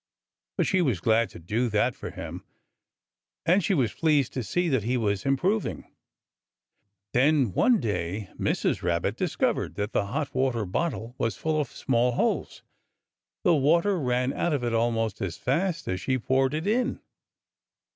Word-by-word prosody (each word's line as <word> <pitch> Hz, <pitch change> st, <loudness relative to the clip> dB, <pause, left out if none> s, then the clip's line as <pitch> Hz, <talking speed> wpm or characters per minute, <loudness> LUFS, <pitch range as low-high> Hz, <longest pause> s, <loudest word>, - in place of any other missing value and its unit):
But -, -, +2 dB
she 190 Hz, -2 st, +2 dB
was 130 Hz, -, +1 dB
glad 115 Hz, +4 st, +2 dB
to -, -, -12 dB
do 110 Hz, +9 st, -1 dB
that 110 Hz, +3 st, +2 dB
for -, -, -7 dB
him. -, -, -7 dB, 1.0 s
And 180 Hz, +3 st, +4 dB
she 190 Hz, -, +2 dB
was 130 Hz, -7 st, +1 dB
pleased 150 Hz, -5 st, +2 dB
to 130 Hz, -, -2 dB
see 175 Hz, +10 st, 0 dB
that 130 Hz, -7 st, +2 dB
he 120 Hz, +5 st, 0 dB
was 100 Hz, -1 st, -1 dB
improving. 185 Hz, +11 st, 0 dB, 1.2 s
Then 135 Hz, -, +3 dB
one 240 Hz, -, +4 dB
day 100 Hz, -, -3 dB
Mrs. -, -, 0 dB
Rabbit 85 Hz, -1 st, 0 dB
discovered -, -, -1 dB
that 105 Hz, +1 st, -2 dB
the 100 Hz, -, +1 dB
hot 140 Hz, +6 st, -3 dB
water 130 Hz, -4 st, 0 dB
bottle 115 Hz, -, -2 dB
was 115 Hz, -, -1 dB
full 155 Hz, -1 st, 0 dB
of 140 Hz, -, -5 dB
small 125 Hz, -1 st, +1 dB
holes. 230 Hz, -, -1 dB, 0.8 s
The 180 Hz, -5 st, +5 dB
water 170 Hz, +6 st, +3 dB
ran 125 Hz, -1 st, 0 dB
out 175 Hz, -, 0 dB
of 140 Hz, -4 st, -1 dB
it 120 Hz, -1 st, -1 dB
almost 115 Hz, -2 st, 0 dB
as 95 Hz, -3 st, -3 dB
fast 165 Hz, +5 st, -1 dB
as 95 Hz, 0 st, -2 dB
she 130 Hz, -1 st, 0 dB
poured 130 Hz, +3 st, +1 dB
it 155 Hz, -, -3 dB
in. 245 Hz, +5 st, 0 dB
130 Hz, 165 wpm, -27 LUFS, 115-155 Hz, 1.2 s, The